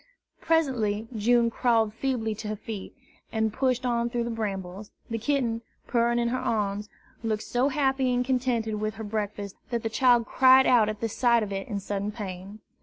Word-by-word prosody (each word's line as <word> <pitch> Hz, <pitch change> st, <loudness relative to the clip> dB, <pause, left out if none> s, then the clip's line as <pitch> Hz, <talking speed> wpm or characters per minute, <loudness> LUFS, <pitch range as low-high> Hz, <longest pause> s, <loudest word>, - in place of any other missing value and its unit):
Presently 240 Hz, -10 st, +1 dB
June 235 Hz, +2 st, +3 dB
crawled 225 Hz, -3 st, +2 dB
feebly 230 Hz, -2 st, -1 dB
to 215 Hz, +1 st, -7 dB
her 215 Hz, -, -2 dB
feet, 210 Hz, -1 st, -7 dB, 0.4 s
and 220 Hz, -1 st, 0 dB
pushed 255 Hz, 0 st, 0 dB
on 235 Hz, -1 st, +1 dB
through 240 Hz, 0 st, -1 dB
the 235 Hz, -, -3 dB
brambles. 200 Hz, -2 st, -4 dB, 0.2 s
The 225 Hz, -, -1 dB
kitten, 235 Hz, -2 st, 0 dB, 0.2 s
purring 235 Hz, 0 st, +1 dB
in 235 Hz, 0 st, +1 dB
her 255 Hz, +2 st, -1 dB
arms, 205 Hz, -1 st, -1 dB, 0.3 s
looked 220 Hz, -2 st, -1 dB
so 250 Hz, +3 st, +1 dB
happy 270 Hz, -2 st, +1 dB
and 245 Hz, 0 st, +1 dB
contented 240 Hz, -4 st, 0 dB
with 215 Hz, 0 st, -2 dB
her 220 Hz, -, -6 dB
breakfast 205 Hz, -2 st, -4 dB
that 235 Hz, -2 st, -2 dB
the 225 Hz, -, -1 dB
child 240 Hz, 0 st, +4 dB
cried 260 Hz, +3 st, +6 dB
out 230 Hz, -4 st, +5 dB
at 215 Hz, -1 st, -5 dB
the 230 Hz, -, +1 dB
sight 235 Hz, +1 st, +2 dB
of 205 Hz, -, -5 dB
it 195 Hz, 0 st, -4 dB
in 205 Hz, -3 st, -3 dB
sudden 200 Hz, +1 st, -3 dB
pain. 200 Hz, -1 st, -7 dB
225 Hz, 185 wpm, -27 LUFS, 210-245 Hz, 0.4 s, cried